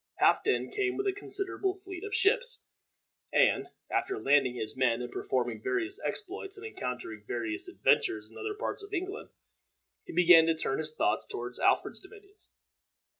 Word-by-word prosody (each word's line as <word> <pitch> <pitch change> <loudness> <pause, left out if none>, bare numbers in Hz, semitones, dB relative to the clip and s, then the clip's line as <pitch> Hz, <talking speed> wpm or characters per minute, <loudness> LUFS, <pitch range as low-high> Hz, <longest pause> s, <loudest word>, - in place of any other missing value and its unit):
Halfden 430 - +3
came 400 -2 0
with 395 - -1
a 390 - +2
considerable 390 -1 -2
fleet 380 -1 -9
of 420 +1 -3
ships, 485 +4 +2 0.7
and, - - +4 0.2
after 390 +1 0
landing 135 -3 +3
his 110 -2 -4
men, 125 -3 +2
and 120 0 -5
performing 120 -4 -1
various 330 - -1
exploits 400 0 -4
and 405 - -9
encountering 125 - -5
various 115 -3 -2
adventures 105 -1 +2
in - - -19
other 425 -1 -4
parts 425 - -3
of 400 0 -6
England, 375 +4 -4 0.8
he - - -8
began 170 -1 +7
to 165 - +3
turn 135 -4 -1
his 155 0 -1
thoughts 110 -8 0
toward 125 +1 -5
Alfred's - - +2
dominions. 405 +1 -15
365 Hz, 160 wpm, -30 LUFS, -, 0.8 s, began